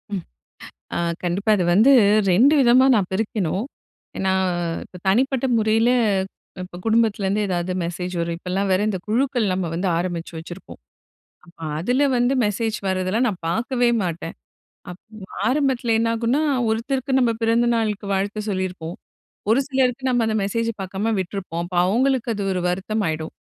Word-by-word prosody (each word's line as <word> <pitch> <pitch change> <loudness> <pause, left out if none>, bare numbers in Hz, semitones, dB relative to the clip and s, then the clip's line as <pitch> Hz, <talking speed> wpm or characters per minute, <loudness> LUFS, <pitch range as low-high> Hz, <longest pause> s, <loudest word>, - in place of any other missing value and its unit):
ம். 185 - -4 0.7
அ - - 0 0.3
கண்டிப்பா 190 +5 0
அது 180 - 0
வந்து 220 +8 +6 0.4
2 255 +11 +5
விதமா 255 +1 +5
நான் 195 -4 0
பிரிக்கணும். 200 -2 -1 0.5
என்னா 190 0 +1 0.5
இப்ப 180 - -13
தனிப்பட்ட 260 +5 +2
முறைல 220 +2 +2 0.7
இப்ப 180 -1 -9
குடும்பத்துல 225 -2 +2
இருந்து 205 +2 0
எதாவது 180 0 -1
மெசேஜ் 180 +2 -4
வரும். 170 0 -2
இப்பலாம் 190 +2 -2
வேற 185 - +2
இந்த 195 -3 -1
குழுக்கள் 240 -2 +1
நம்ம 185 -1 -1
வந்து 180 +3 -1
ஆரம்பிச்சு 175 -1 -4
வச்சிருப்போம். 175 - -10 0.7
அப்ப 170 - -20 0.2
அதுல 250 - +1
வந்து 245 +2 +2
மெசேஜ் 220 +2 -1
வர்றதெல்லாம் 190 +6 0
நான் 190 -5 -5
பார்க்கவே 240 +7 +1 0.2
மாட்டேன். 165 -1 -4 0.6
அப் 180 +1 -10 0.5
ஆரம்பத்துல 260 -4 +1
என்ன 230 0 +1
ஆகும்னா, 235 +6 +1 0.3
ஒருத்தருக்கு 260 +4 -1
நம்ம 245 -2 +3
பிறந்தநாளுக்கு 225 -2 +1
வாழ்த்து 200 +2 -1
சொல்லிருப்போம், 185 -3 -3 0.6
ஒரு 235 +5 +4
சிலருக்கு 260 -1 0
நம்ம 245 -2 +2
அந்த 220 0 0
மெசேஜ 230 +3 -1
பாக்காம 195 +4 -2
விட்ருப்போம். 180 -2 -4
அப்ப 180 0 -6
அவங்களுக்கு 250 +4 +1
அது 200 -1 -3
ஒரு 185 - -1
வருத்தமாயிடும். 180 -4 -2
210 Hz, 145 wpm, -22 LUFS, 185-240 Hz, 0.7 s, வந்து